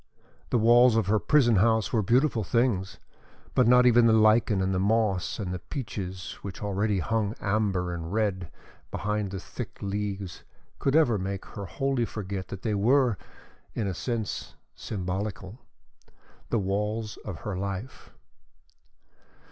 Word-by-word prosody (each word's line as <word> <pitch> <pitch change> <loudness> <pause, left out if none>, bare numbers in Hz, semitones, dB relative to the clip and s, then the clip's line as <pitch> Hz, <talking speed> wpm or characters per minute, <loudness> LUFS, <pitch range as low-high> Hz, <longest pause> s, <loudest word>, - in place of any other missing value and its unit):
The - - +2
walls 120 +1 +6
of 115 - +2
her 105 +2 +2
prison 120 -6 +4
house 110 +3 +2
were 110 - +3
beautiful 120 +2 +2
things, 105 -3 0 0.6
but 125 - +4
not 125 +1 +6
even 120 -1 +6
the 115 - +5
lichen 110 -1 +4
and 95 0 0
the 90 - 0
moss 100 -3 +1
and 95 -4 -3
the 90 - -4
peaches 95 - -6
which 100 +1 -7
already 100 +1 0
hung 110 +3 -1
amber 95 -4 0
and 85 0 -5
red 100 -5 -1 0.4
behind 105 0 -2
the 95 0 -5
thick - - -8
leaves 100 -2 -4 0.4
could 135 +1 +1
ever 120 -10 +4
make 95 +1 -4
her 100 - -7
wholly 130 - 0
forget 100 -3 -5
that 95 - -8
they 110 - 0
were, 120 +3 +3 0.6
in 110 - -1
a 95 - -1
sense, 110 +2 -4 0.2
symbolical 95 +2 -5 0.9
the 120 - +1
walls 105 +2 -2
of 95 -5 -8
her 105 - -4
life. 100 +5 -5
105 Hz, 150 wpm, -27 LUFS, 95-115 Hz, 0.9 s, walls